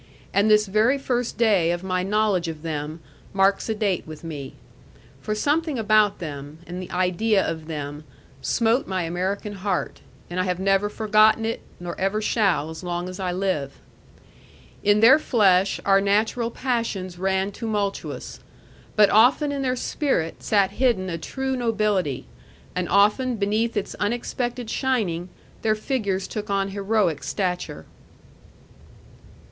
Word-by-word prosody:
And 200 Hz, +2 st, +3 dB
this 210 Hz, 0 st, +5 dB
very 215 Hz, +7 st, +2 dB
first 245 Hz, -3 st, -2 dB
day 205 Hz, -8 st, +3 dB
of 175 Hz, +1 st, -3 dB
my 185 Hz, -1 st, 0 dB
knowledge 200 Hz, -2 st, +1 dB
of 160 Hz, -1 st, -6 dB
them 155 Hz, 0 st, -4 dB, 0.3 s
marks 195 Hz, +2 st, +2 dB
a 220 Hz, -, 0 dB
date 200 Hz, -6 st, -1 dB
with 155 Hz, 0 st, -9 dB
me. 145 Hz, -5 st, -7 dB, 0.7 s
For 215 Hz, -, -2 dB
something 295 Hz, +5 st, 0 dB
about 215 Hz, -2 st, +3 dB
them, 145 Hz, -2 st, -7 dB
and 180 Hz, +1 st, -6 dB
the 185 Hz, -, -8 dB
idea 185 Hz, +3 st, +1 dB
of 160 Hz, -1 st, -4 dB
them, 150 Hz, -1 st, -5 dB, 0.4 s
smote 235 Hz, -, +1 dB
my 185 Hz, -2 st, -1 dB
American 190 Hz, +5 st, -2 dB
heart, 195 Hz, -1 st, -3 dB, 0.3 s
and 175 Hz, +1 st, -4 dB
I -, -, +2 dB
have 180 Hz, -1 st, -1 dB
never 195 Hz, +1 st, +2 dB
forgotten 215 Hz, +1 st, +3 dB
it, 225 Hz, -, -2 dB, 0.2 s
nor 175 Hz, -1 st, -5 dB
ever 195 Hz, +3 st, +1 dB
shall, 200 Hz, -8 st, +1 dB
as 160 Hz, +3 st, -9 dB
long 175 Hz, 0 st, -3 dB
as 185 Hz, -, -8 dB
I 185 Hz, -2 st, -1 dB
live. 175 Hz, -7 st, -1 dB, 1.1 s
In 205 Hz, +1 st, +3 dB
their 265 Hz, +6 st, +8 dB
flesh 195 Hz, -8 st, +3 dB
our 195 Hz, 0 st, +5 dB
natural 220 Hz, +4 st, +1 dB
passions 230 Hz, -8 st, -3 dB
ran 190 Hz, +1 st, 0 dB
tumultuous; 205 Hz, -2 st, -3 dB, 0.6 s
but 210 Hz, -2 st, +5 dB
often 250 Hz, +7 st, +5 dB
in 280 Hz, -1 st, -2 dB
their 255 Hz, -1 st, 0 dB
spirit 255 Hz, -, -1 dB
sat 200 Hz, -2 st, +2 dB
hidden 205 Hz, -6 st, +1 dB
a 165 Hz, -, -3 dB
true 265 Hz, +9 st, -3 dB
nobility, 215 Hz, -, 0 dB, 0.5 s
and 180 Hz, -1 st, -2 dB
often 210 Hz, +6 st, +3 dB
beneath 215 Hz, +2 st, 0 dB
its 205 Hz, -, -2 dB
unexpected 240 Hz, +2 st, -2 dB
shining 210 Hz, -10 st, -1 dB, 0.3 s
their 215 Hz, -1 st, +2 dB
figures 210 Hz, -5 st, -2 dB
took 210 Hz, -1 st, -5 dB
on 195 Hz, 0 st, 0 dB
heroic 195 Hz, -5 st, 0 dB
stature. 180 Hz, -6 st, -3 dB
200 Hz, 145 wpm, -24 LUFS, 180-225 Hz, 1.1 s, their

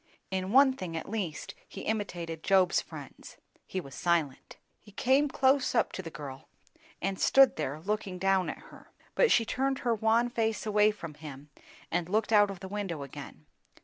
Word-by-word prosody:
In 190 Hz, 0 st, -2 dB
one 265 Hz, +2 st, +6 dB
thing 180 Hz, -9 st, -5 dB
at 160 Hz, -, -6 dB
least 195 Hz, -9 st, -4 dB
he -, -, -9 dB
imitated 175 Hz, -7 st, -3 dB
Job's 190 Hz, -1 st, +3 dB
friends; -, -, -11 dB, 0.3 s
he 190 Hz, -, -3 dB
was 140 Hz, -7 st, -10 dB
silent. 165 Hz, -6 st, -1 dB, 0.2 s
He 210 Hz, -, -17 dB
came 265 Hz, +7 st, +2 dB
close 265 Hz, -1 st, +2 dB
up -, -, +2 dB
to -, -, -5 dB
the 170 Hz, -, -7 dB
girl 135 Hz, -3 st, -9 dB, 0.5 s
and 195 Hz, 0 st, -1 dB
stood 270 Hz, -1 st, +5 dB
there, 150 Hz, -1 st, -3 dB
looking 200 Hz, +1 st, -3 dB
down 190 Hz, 0 st, +2 dB
at -, -, -5 dB, 0.2 s
her. -, -, -15 dB, 0.2 s
But -, -, +3 dB
she 230 Hz, -, +4 dB
turned 270 Hz, +3 st, 0 dB
her 235 Hz, -, +3 dB
wan 225 Hz, +2 st, +2 dB
face 220 Hz, -3 st, -1 dB
away 210 Hz, 0 st, +4 dB
from 170 Hz, -7 st, -6 dB
him 145 Hz, -1 st, -11 dB, 0.4 s
and 175 Hz, 0 st, -1 dB
looked 215 Hz, +2 st, +1 dB
out 205 Hz, -1 st, +6 dB
of 195 Hz, -3 st, -7 dB
the 190 Hz, -, -6 dB
window 190 Hz, -7 st, -4 dB
again. 140 Hz, -, -10 dB
195 Hz, 180 wpm, -30 LUFS, 165-225 Hz, 0.5 s, one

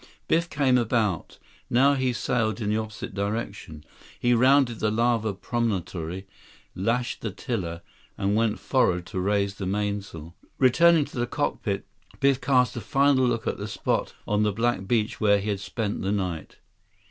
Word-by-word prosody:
Biff 170 Hz, +1 st, +1 dB
came 130 Hz, -4 st, +3 dB
about. 110 Hz, -7 st, -1 dB, 0.3 s
Now 135 Hz, +4 st, +4 dB
he 130 Hz, -2 st, +1 dB
sailed 120 Hz, -2 st, -1 dB
in 105 Hz, -2 st, -1 dB
the 105 Hz, -, +1 dB
opposite 110 Hz, -3 st, -5 dB
direction. 100 Hz, -6 st, -4 dB, 0.4 s
He 120 Hz, 0 st, +3 dB
rounded 130 Hz, -1 st, +4 dB
the 110 Hz, -, +1 dB
lava 115 Hz, 0 st, +1 dB
promontory, 95 Hz, -5 st, -3 dB, 0.5 s
lashed 120 Hz, +6 st, -1 dB
the 110 Hz, -, -2 dB
tiller, 90 Hz, -5 st, -4 dB, 0.3 s
and 100 Hz, +1 st, 0 dB
went 110 Hz, -1 st, +1 dB
forward 90 Hz, -10 st, +1 dB
to 95 Hz, -, -5 dB
raise 100 Hz, +1 st, +1 dB
the 95 Hz, -1 st, -5 dB
mainsail. 100 Hz, -5 st, -3 dB, 0.2 s
Returning 160 Hz, +4 st, +5 dB
to 125 Hz, -, -7 dB
the 120 Hz, -, 0 dB
cockpit, 110 Hz, -8 st, -2 dB, 0.3 s
Biff 135 Hz, -1 st, +3 dB
cast 125 Hz, -1 st, +2 dB
a 120 Hz, -, -4 dB
final 135 Hz, +3 st, +3 dB
look 115 Hz, -2 st, -1 dB
at -, -, -1 dB
the 100 Hz, -, -4 dB
spot 100 Hz, -2 st, -2 dB
on 105 Hz, 0 st, +1 dB
the 105 Hz, 0 st, +2 dB
black 115 Hz, -2 st, -1 dB
beach 110 Hz, -1 st, 0 dB
where 100 Hz, -1 st, +5 dB
he 100 Hz, +2 st, -3 dB
had 100 Hz, -2 st, -1 dB
spent 105 Hz, +1 st, -3 dB
the 95 Hz, -, -1 dB
night. 90 Hz, -5 st, -3 dB
110 Hz, 165 wpm, -26 LUFS, 100-125 Hz, 0.5 s, Returning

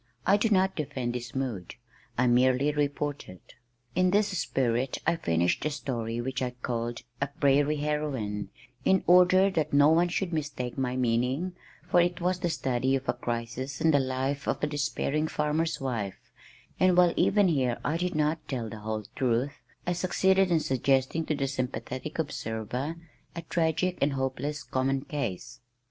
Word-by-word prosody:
I 200 Hz, -, +5 dB
do 210 Hz, +2 st, +2 dB
not 190 Hz, -2 st, +3 dB
defend 130 Hz, -5 st, -3 dB
this 125 Hz, 0 st, -6 dB
mood, 120 Hz, -10 st, -3 dB, 0.4 s
I 130 Hz, -, +3 dB
merely 130 Hz, +3 st, +3 dB
report 145 Hz, 0 st, -2 dB
it. 90 Hz, -, -14 dB, 0.4 s
In 185 Hz, +1 st, +3 dB
this 205 Hz, +2 st, +3 dB
spirit 125 Hz, -5 st, 0 dB
I 165 Hz, -, +3 dB
finished 85 Hz, -, 0 dB
a 150 Hz, -, +1 dB
story 120 Hz, -6 st, -3 dB
which 130 Hz, +2 st, -3 dB
I 125 Hz, -, 0 dB
called 120 Hz, 0 st, -2 dB, 0.2 s
A 140 Hz, -, +1 dB
Prairie 145 Hz, +1 st, +2 dB
Heroine 145 Hz, -9 st, -2 dB, 0.3 s
(in 190 Hz, -1 st, +3 dB
order 180 Hz, +2 st, +6 dB
that 155 Hz, -5 st, -1 dB
no 145 Hz, +1 st, +6 dB
one 170 Hz, +2 st, +4 dB
should 175 Hz, 0 st, -2 dB
mistake 145 Hz, -6 st, -3 dB
my 130 Hz, -2 st, -1 dB
meaning, 130 Hz, +8 st, 0 dB, 0.3 s
for 175 Hz, -, +5 dB
it 175 Hz, 0 st, 0 dB
was 180 Hz, +1 st, 0 dB
the 175 Hz, -, 0 dB
study 130 Hz, -3 st, 0 dB
of 135 Hz, 0 st, -4 dB
a -, -, +2 dB
crisis 120 Hz, +3 st, -4 dB
in 160 Hz, -, +4 dB
the 145 Hz, -, +4 dB
life 135 Hz, +2 st, -2 dB
of -, -, -1 dB
a -, -, +3 dB
despairing 145 Hz, +1 st, -1 dB
farmer's 155 Hz, +2 st, 0 dB
wife), 115 Hz, -8 st, -4 dB, 0.5 s
and 185 Hz, -1 st, +4 dB
while 180 Hz, -1 st, +6 dB
even 205 Hz, -1 st, +4 dB
here, 130 Hz, -6 st, +1 dB
I 155 Hz, +3 st, +1 dB
did 180 Hz, 0 st, -2 dB
not 155 Hz, +1 st, 0 dB
tell 120 Hz, -5 st, -3 dB
the 110 Hz, -, -8 dB
whole 110 Hz, 0 st, -4 dB
truth, 130 Hz, +3 st, 0 dB, 0.2 s
I 180 Hz, -, +1 dB
succeeded 190 Hz, +2 st, +2 dB
in 165 Hz, -2 st, +3 dB
suggesting 135 Hz, +4 st, +1 dB
to 155 Hz, -, +1 dB
the 140 Hz, -1 st, -1 dB
sympathetic 130 Hz, +2 st, -4 dB
observer 125 Hz, -1 st, -3 dB, 0.4 s
a 170 Hz, -, -5 dB
tragic 165 Hz, +2 st, 0 dB
and 140 Hz, 0 st, +2 dB
hopeless 135 Hz, +2 st, -2 dB
common 135 Hz, +1 st, 0 dB
case. 125 Hz, -, -4 dB
140 Hz, 170 wpm, -28 LUFS, 125-165 Hz, 0.5 s, order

